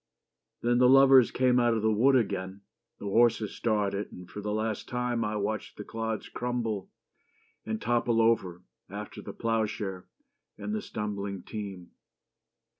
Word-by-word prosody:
Then 120 +1 +3
The 125 0 +6
lovers 135 -2 +7
came 125 -1 +3
out 120 -1 +3
of 110 - -2
the 110 - +3
wood 130 +6 +4
again: 100 -4 -1 0.4
The - - -9
horses 115 +1 +3
started 105 -3 -1
and 90 -1 -11
for 95 +3 -8
the 105 0 -3
last 110 0 -2
time 125 -1 -1
I 105 0 -2
watched 105 +1 -3
the 105 - -6
clods 110 0 -4
crumble 115 -5 -3 0.8
and 110 0 -2
topple 120 0 +1
over 95 -6 +1 0.3
After - - -7
the - - -7
ploughshare 105 -4 -2 0.5
and 210 - -4
the 215 - -1
stumbling 100 - -4
team. 100 -5 -7
110 Hz, 150 wpm, -29 LUFS, 100-120 Hz, 0.8 s, lovers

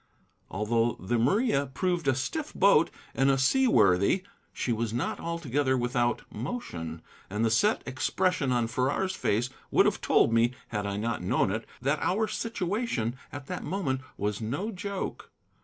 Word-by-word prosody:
Although 115 +3 0
the 115 +6 0
Maria 145 - +2
proved 175 +3 -1
a 135 - +4
stiff 300 - -3
boat 190 -5 +5 0.2
and 135 +1 +3
a 135 - +4
seaworthy, 130 - +4 0.3
she 120 - -1
was 115 0 -2
not 120 +4 -2
altogether 145 -5 0
without 120 -1 0
motion; 85 - -5 0.3
and 105 +4 0
the 115 - +2
set 205 - +3
expression 145 +3 0
on 120 -2 +2
Farrar's 135 +11 0
face 120 +5 0 0.2
would - - +4
have - - +1
told 115 - +3
me, 115 +2 +3 0.2
had 105 -2 -2
I 100 0 -2
not 115 0 -2
known 95 +1 +1
it, 110 +2 -3 0.2
that 145 +3 +1
our 215 +4 +1
situation 200 - -2 0.2
at 145 -1 -7
that - - -5
moment 150 -7 -1 0.2
was 105 +1 -2
no 140 - -2
joke. 200 0 -5
130 Hz, 155 wpm, -28 LUFS, 115-180 Hz, 0.3 s, boat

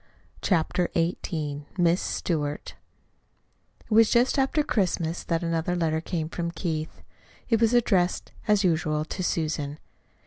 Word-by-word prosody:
CHAPTER 175 -1 +1
XVIII 155 -3 -2
"MISS 175 0 +3
STEWART" 150 -4 -2 1.1
It - - -25
was 225 0 +6
just 245 +3 +3
after 270 +3 +2
Christmas 175 - 0
that 165 0 -1
another 165 +1 0
letter 160 -2 0
came 165 -2 -3
from 170 +1 -3
Keith. 160 -2 -4 0.5
It 225 -2 +3
was 230 +1 +4
addressed 190 -7 +2 0.2
as 210 -1 +4
usual 155 -3 +1
to 185 +3 -4
Susan. 155 -4 -1
170 Hz, 130 wpm, -26 LUFS, 160-190 Hz, 1.1 s, was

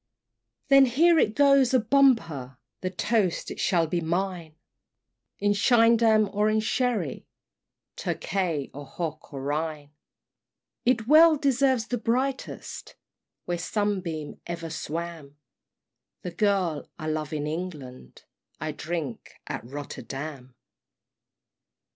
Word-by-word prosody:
VII. - - -56
Then 275 0 +8
here 325 +7 +4
it 215 -5 +2
goes, 275 -3 +5
a - - +6
bumper 220 - +2 0.2
The 185 - -1
toast 190 0 0
it - - -7
shall 170 -4 +2
be 170 +2 -1
mine, 170 -1 -2 0.8
In 205 0 +2
schiedam, 225 0 +4
or 210 +1 +2
in 215 0 +2
sherry, 220 - -1 0.7
Tokay, 170 -7 -2
or 145 0 -9
hock 160 -3 -6
of 140 - -6
Rhine; 145 +1 -3 0.9
It 240 -3 +2
well 315 +2 +7
deserves 270 -4 +2
the 245 0 -3
brightest, 255 +4 -3 0.5
Where 175 -1 -2
sunbeam 180 -6 -3
ever 170 -1 -5
swam 160 -3 -6 0.9
"The 180 - -4
Girl 185 -4 0
I 155 - -7
love 155 -1 -2
in 150 -2 -2
England" 150 - -7 0.4
I 155 +1 -3
drink 155 -5 -5
at - - -5
Rotterdam! 135 0 -7
180 Hz, 115 wpm, -26 LUFS, 155-230 Hz, 0.9 s, Then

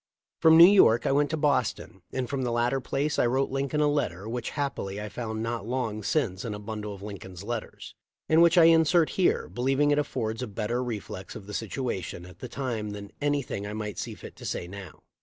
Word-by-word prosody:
* - - -65
From 160 0 +7
New 170 - +11
York 175 - +6
I - - +2
went 145 +1 +2
to 160 - -1
Boston, 140 - 0
and 130 -1 -2
from 140 0 -2
the 125 -2 -1
latter 120 +3 +1
place 145 +4 -1
I - - +4
wrote 130 +3 0
Lincoln 140 +2 -1
a 150 - +4
letter 105 - -1
which 120 +1 -3
happily 105 -9 -3
I 105 0 -5
found 110 -1 -4
not 115 -2 -3
long 115 -4 -2
since 100 - -1
in 110 -3 -4
a - - -7
bundle 105 -1 -5
of 100 - -12
Lincoln's 95 -3 -8
letters, 115 +1 -6 0.3
and 160 +1 +5
which 170 +1 +5
I 170 - +8
insert 165 0 +5
here, 185 - +1
believing 135 +4 +1
it 145 - +3
affords 110 -5 -2
a 125 - -3
better 115 +4 -2
reflex 105 -5 -6
of 100 - -9
the 105 - -9
situation 105 -6 -4
at 90 0 -14
the 125 - -7
time 115 -6 -3
than 100 0 -8
anything 140 -8 -1
I 105 - -5
might 105 -3 -4
see - - -5
fit - - -11
to - - -10
say 85 - -3
now. 95 0 -10
120 Hz, 225 wpm, -27 LUFS, 105-140 Hz, 0.3 s, New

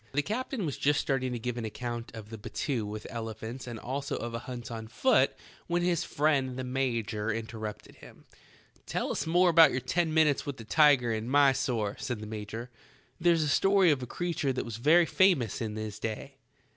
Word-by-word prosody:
The 145 +2 +1
captain 230 - -3
was 145 - -3
just 145 +1 +3
starting 130 -2 -1
to - - -2
give 120 +1 -4
an - - -4
account 120 +2 -5
of 110 0 -9
a - - -5
battue 115 +1 -3
with 105 +1 -6
elephants 115 +2 -6
and 120 -2 -5
also 135 +5 -3
of 120 0 -5
a 115 - -2
hunt 120 -2 -6
on 110 -1 -6
foot 250 - +2 0.3
when 175 0 0
his 175 -1 +1
friend 140 -5 +1
the 130 - -3
major 115 -4 -1
interrupted 110 -1 -6
him. - - -15 0.6
"Tell - - -2
us - - -2
about 170 -1 +6
your 130 - -1
ten 160 +6 0
minutes 155 -3 +3
with 140 -2 -5
the 115 - -9
tiger 135 -2 +4
in 110 +2 -3
Mysore," 135 -6 +2
said 125 -3 -3
the 110 - -7
major. 110 +3 -6 0.5
"There's 170 -2 +3
a - - -1
story 195 +4 +4
of 140 -3 0
a 125 - -5
creature 170 -3 -1
that 130 - -3
was 115 -2 -6
very 160 +8 +5
famous 165 - +2
in 110 -2 -3
his 110 -1 -5
day." 115 +5 -5
125 Hz, 195 wpm, -29 LUFS, 115-150 Hz, 0.6 s, about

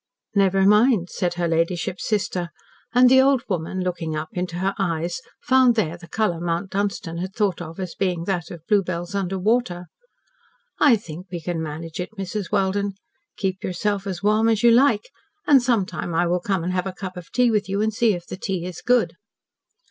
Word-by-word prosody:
"Never 195 -1 +3
mind," 210 -2 +4
said 175 -1 -1
her 175 -1 0
ladyship's 165 +2 -1
sister, 185 -5 -1 0.4
and 250 +1 +6
the 260 +1 +7
old 270 -2 +3
woman, 185 0 -2
looking 170 -3 -2
up 155 +1 -4
into 180 -1 -3
her 190 +2 0
eyes, 170 +3 -1 0.2
found 260 -3 +5
there 170 -7 0
the 175 -1 -13
colour 180 -3 0
Mount 170 +3 -2
Dunstan 195 -4 -2
had 185 +2 -5
thought 200 -6 0
of 165 +1 -8
as 185 -2 -4
being 180 -3 -1
that 175 -2 -2
of 170 -2 -10
bluebells 180 -3 0
under 195 -1 -1
water. 190 -3 0 0.9
"I 285 -6 +6
think 180 -3 -8
we 175 - -3
can 165 0 -3
manage 160 +2 -6
it, 195 +5 -6
Mrs. 195 0 -4
Welden. 200 0 +1 0.4
Keep 190 -1 -2
yourself 200 +2 -1
as 185 -1 -4
warm 215 +2 +3
as 220 -1 +1
you 235 - +7
like, 235 -3 +3 0.3
and 275 -3 +6
sometime 210 -8 -1
I 175 +2 +3
will 175 +1 +1
come 185 -1 -1
and 180 +2 -2
have 185 0 -1
a 190 - -4
cup 185 0 -7
of 180 -2 -10
tea 250 -2 +3
with 210 -3 0
you 195 +1 -1
and 220 0 0
see 220 -2 +2
if 175 -1 -8
the - - -7
tea 185 -3 -3
is 180 -2 -7
good." 240 -9 +2
190 Hz, 200 wpm, -23 LUFS, 175-210 Hz, 0.9 s, the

